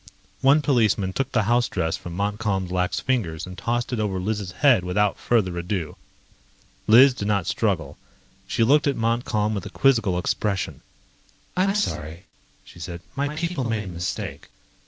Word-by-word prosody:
One 140 +3 +5
policeman 110 -8 +2
took 135 +3 -2
the 110 -4 +2
house 120 +3 +2
dress 80 0 -1
from 85 - -8
Montcalm's 100 -2 -1
lax 90 0 0
fingers 100 -12 -1
and 90 0 -9
tossed 120 +5 -2
it 120 - -1
over 100 -3 -1
Liz' 105 0 -2
head 125 -3 +4
without 100 +3 +1
further 95 -7 +1
ado. 85 -3 -3 0.9
Liz 125 +5 +8
did 100 -5 -4
not 100 -4 +1
struggle. - - -1 0.5
She - - +1
looked 145 +5 +4
at 140 - +1
Montcalm 115 -2 0
with 100 -4 -4
a - - -8
quizzical 115 -9 +2
expression. 95 +2 -2 0.7
"I'm 195 +2 +2
sorry," 80 - -3 0.4
she - - -15
said. 85 +1 -6
"My 145 +2 -2
people 170 -3 -2
made 110 -2 -1
a - - -9
mistake. 85 0 -5
105 Hz, 160 wpm, -24 LUFS, 90-125 Hz, 0.9 s, Liz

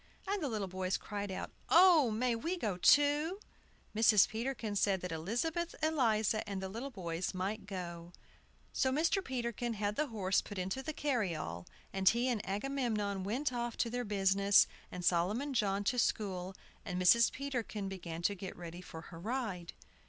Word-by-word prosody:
And 400 0 -1
the 290 - -1
little 210 -4 -2
boys 185 +1 -1
cried 205 -1 -5
out, 185 - -5 0.2
"Oh, 340 -7 +7
may 235 +2 0
we 330 +10 -2
go 215 - -1
too?" 290 - +4 0.6
Mrs. 215 -2 +6
Peterkin 225 -2 -3
said 195 -1 +2
that 180 - -4
Elizabeth 245 - -2
Eliza 225 -8 +2
and 195 -1 -3
the 190 0 -4
little 235 +8 -5
boys 180 -5 -4
might 195 +2 -3
go. 175 -3 -6 0.6
So 260 - +2
Mr. 330 +7 +2
Peterkin 240 - -3
had 205 0 -1
the 305 - +1
horse 195 -6 +1
put 205 - -9
into 190 +8 -2
the 310 - -4
carryall, 180 - -2 0.3
and 195 -1 +4
he 240 +2 +1
and 225 -4 -1
Agamemnon 210 -3 -1
went 255 +7 -1
off 240 -1 -3
to 230 - 0
their 245 0 -2
business, 200 -1 +4 0.3
and 180 -1 -5
Solomon 205 +12 +1
John 200 -4 +1
to 250 +5 +1
school; 190 -5 -1 0.3
and 180 -1 -3
Mrs. 230 +6 +6
Peterkin 245 -7 -4
began 170 -3 -6
to 205 - +2
get 190 -1 -7
ready 175 0 -8
for 165 -2 -9
her 165 0 -11
ride. 210 -5 -3
210 Hz, 170 wpm, -34 LUFS, 190-255 Hz, 0.6 s, Oh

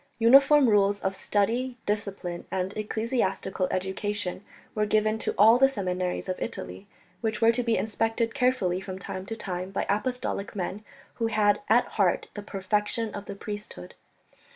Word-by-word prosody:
Uniform 275 +4 +6
rules 205 -2 +3
of 190 0 -1
study, 235 +7 0
discipline 200 -4 -3
and 190 +1 -2
ecclesiastical 215 -4 -1
education 190 +1 -3 0.3
were 210 -1 0
given 215 +1 +2
to - - -2
all 225 +4 +7
the 270 0 +6
seminaries 185 -7 -2
of 185 - -3
Italy, 95 +2 -6 0.3
which 220 -2 -1
were 230 0 +5
to 235 - 0
be 230 -2 +1
inspected 225 +1 -1
carefully 250 -9 +1
from 190 -1 -6
time 185 0 -6
to 225 - -4
time 185 -3 -4
by 195 - -2
apostolic 210 -1 -2
men, 195 +2 -4 0.3
who 230 - 0
had 210 -1 +2
at 235 +3 +5
heart 190 -4 0
the 205 - -6
perfection 210 +2 -1
of 205 0 -6
the - - -7
priesthood. 205 - -7
210 Hz, 155 wpm, -27 LUFS, 190-225 Hz, 0.3 s, all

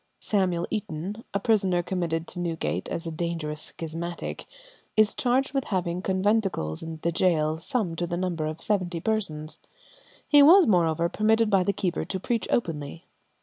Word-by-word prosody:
Samuel 180 -4 0
Eaton, 205 +1 -4
a 200 - 0
prisoner 190 -5 +2
committed 170 -3 -2
to 180 - -5
Newgate 170 -2 -2
as 165 - -3
a 165 - -3
dangerous 160 -2 -3 0.2
schismatic, 165 +1 -4 0.5
is 215 -1 +5
charged 260 +2 +1
with 270 -1 0
having 180 -3 -1
conventicles 190 - 0
in 160 0 -6
the 170 - +1
gaol, 160 -3 +1
some 180 -2 -1
to 175 - -1
the 175 0 -2
number 175 -4 -1
of 155 +1 -6
seventy 185 -5 0
persons. 160 -7 -1 0.7
He 290 -1 +7
was, 345 +6 +8
moreover, 170 - +2
permitted 220 +3 +2
by 195 -2 +5
the 200 - +1
keeper 180 -3 -2
to 190 +3 -4
preach 230 +4 -1
openly. 165 -5 -2
175 Hz, 160 wpm, -26 LUFS, 165-210 Hz, 0.7 s, was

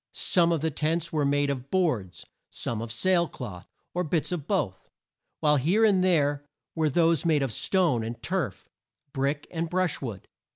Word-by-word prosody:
Some 170 -2 +3
of 165 -3 0
the 160 0 0
tents 165 +3 -1
were 150 -2 +1
made 145 0 +2
of 130 -1 -6
boards, 125 - -1 0.2
some 115 -2 -2
of 115 0 -5
sail 170 +7 +2
cloth, 100 -12 -8 0.3
or 180 - 0
bits 160 0 -1
of 160 -5 -4
both, 120 - -2 0.5
while 150 -2 +4
here 180 - +3
and 195 -4 +3
there 145 -6 +2 0.3
were 160 -2 +1
those 165 0 +2
made 155 -4 +2
of 135 - -1
stone 170 - +1
and 115 +1 -5
turf, - - -3 0.5
brick 140 +2 -1
and 165 -1 -3
brush 180 -2 0
wood. 115 -8 -6
150 Hz, 175 wpm, -27 LUFS, 135-170 Hz, 0.5 s, while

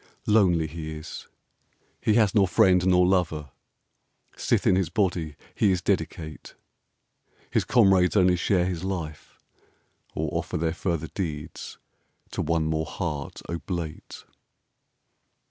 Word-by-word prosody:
Lonely 95 -7 +4
he 80 0 -6
is: 75 +2 -9 0.7
he 105 - +2
has 110 -5 +4
nor 100 -3 +4
friend 90 -2 +4
nor 90 -1 +5
lover, 80 -6 0 0.8
Sith - - 0
in 95 - +5
his 95 -4 +1
body 85 -5 -1 0.2
he 105 - +2
is 90 - +1
dedicate.... 80 -2 -3 1.0
His - - +1
comrades 95 -6 +4
only 90 -2 +5
share 90 0 +1
his 90 -2 -3
life, 85 -5 -5 0.8
or 80 - -1
offer 85 +1 -2
Their 80 0 0
further 85 -3 -2
deeds 75 -6 -5 0.5
to - - -2
one 80 0 0
more 80 0 -1
heart 75 -7 -5
oblate. 85 -2 -5
85 Hz, 125 wpm, -26 LUFS, 80-95 Hz, 1.0 s, nor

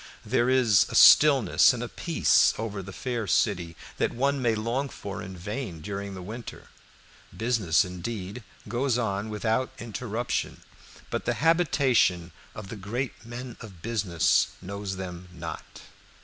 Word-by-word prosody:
There 120 +2 +2
is 125 -6 +4
a - - -5
stillness 140 -6 +7
and - - -4
a - - -3
peace - - +3
over 105 -2 -4
the 100 +1 -9
fair 120 0 -3
city 85 -6 +1 0.2
that - - +1
one 140 +2 +1
may 115 -3 +2
long 120 +6 -2
for 100 -5 -7
in 95 0 -8
vain 105 -1 -5
during 100 +2 -5
the 90 - -8
winter. 115 +5 -9 0.7
Business 110 -10 +2
indeed 95 +4 -6 0.3
goes 120 +3 0
on 105 -2 -2
without 110 +4 0
interruption, 115 +1 -4 0.5
but - - -2
the - - 0
habitation 135 - +2 0.2
of 100 -3 -8
the 115 - -7
great 120 +8 -4
men 120 0 -7
of 95 -8 -12
business 105 -7 +2
knows 100 +1 -5
them 90 -1 -7
not. 85 -1 -8
110 Hz, 145 wpm, -27 LUFS, 95-120 Hz, 0.7 s, stillness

